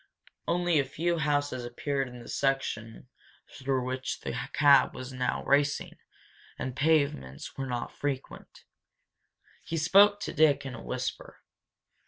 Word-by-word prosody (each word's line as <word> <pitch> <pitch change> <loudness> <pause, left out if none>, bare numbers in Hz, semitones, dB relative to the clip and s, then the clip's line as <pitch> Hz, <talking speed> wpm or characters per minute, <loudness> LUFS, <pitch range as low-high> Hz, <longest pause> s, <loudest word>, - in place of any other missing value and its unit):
Only 175 -2 +2
a - - +3
few 165 +5 -1
houses 145 -3 0
appeared 135 +3 -2
in 125 0 -10
the 120 - -11
section 125 -5 -2 0.5
through 130 -2 -1
which 130 0 -3
the - - -4 0.2
cab 145 -1 +5
was 130 0 -7
now 125 0 -1
racing 145 +1 +1 0.6
and 130 -1 -4
pavements 140 - 0
were 135 0 -4
not 120 -1 -3
frequent. 140 -2 -5 1.0
He 165 - -3
spoke 200 +6 +5
to - - -4
Dick: 145 -2 +3
in 135 - -5
a 115 - -8
whisper. 130 0 -5
135 Hz, 135 wpm, -29 LUFS, 125-150 Hz, 1.0 s, cab